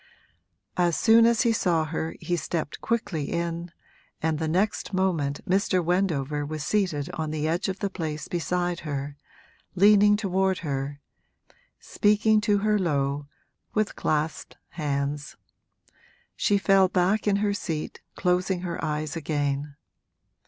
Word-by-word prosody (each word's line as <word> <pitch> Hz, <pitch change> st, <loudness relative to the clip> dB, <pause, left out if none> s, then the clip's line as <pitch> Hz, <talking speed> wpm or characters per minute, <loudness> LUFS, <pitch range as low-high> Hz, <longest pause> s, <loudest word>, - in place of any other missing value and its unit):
As 175 Hz, -2 st, +2 dB
soon 230 Hz, 0 st, +6 dB
as 235 Hz, -1 st, +3 dB
he 235 Hz, -2 st, +3 dB
saw 170 Hz, -6 st, +1 dB
her 160 Hz, +1 st, -3 dB
he 175 Hz, -, -1 dB
stepped 165 Hz, -3 st, -3 dB
quickly 205 Hz, -10 st, -1 dB
in, 170 Hz, 0 st, -2 dB, 0.5 s
and 160 Hz, -1 st, 0 dB
the 160 Hz, -, -1 dB
next 195 Hz, +5 st, 0 dB
moment 165 Hz, -7 st, 0 dB
Mr. 185 Hz, -2 st, +2 dB
Wendover 155 Hz, -6 st, 0 dB
was 155 Hz, +1 st, -4 dB
seated 180 Hz, -5 st, 0 dB
on 160 Hz, -3 st, -3 dB
the 155 Hz, 0 st, -2 dB
edge 175 Hz, +5 st, 0 dB
of 190 Hz, 0 st, -5 dB
the 200 Hz, -, 0 dB
place 155 Hz, -4 st, -4 dB
beside 175 Hz, 0 st, -1 dB
her, 145 Hz, -2 st, -4 dB, 0.6 s
leaning 205 Hz, +2 st, +6 dB
toward 190 Hz, -2 st, +1 dB
her, 140 Hz, 0 st, -3 dB, 0.8 s
speaking 210 Hz, +1 st, +2 dB
to 210 Hz, -1 st, +2 dB
her 210 Hz, -1 st, +3 dB
low, 145 Hz, -4 st, -1 dB, 0.5 s
with 215 Hz, -1 st, 0 dB
clasped 155 Hz, +1 st, -2 dB
hands. 145 Hz, -2 st, -3 dB, 1.0 s
She 205 Hz, -, +2 dB
fell 195 Hz, -1 st, +4 dB
back 190 Hz, +4 st, +1 dB
in 200 Hz, -, +4 dB
her 205 Hz, 0 st, +1 dB
seat, 160 Hz, -6 st, -4 dB
closing 180 Hz, 0 st, +1 dB
her 175 Hz, -2 st, -4 dB
eyes 150 Hz, 0 st, -2 dB
again. 145 Hz, -2 st, -2 dB
175 Hz, 135 wpm, -26 LUFS, 150-195 Hz, 1.0 s, soon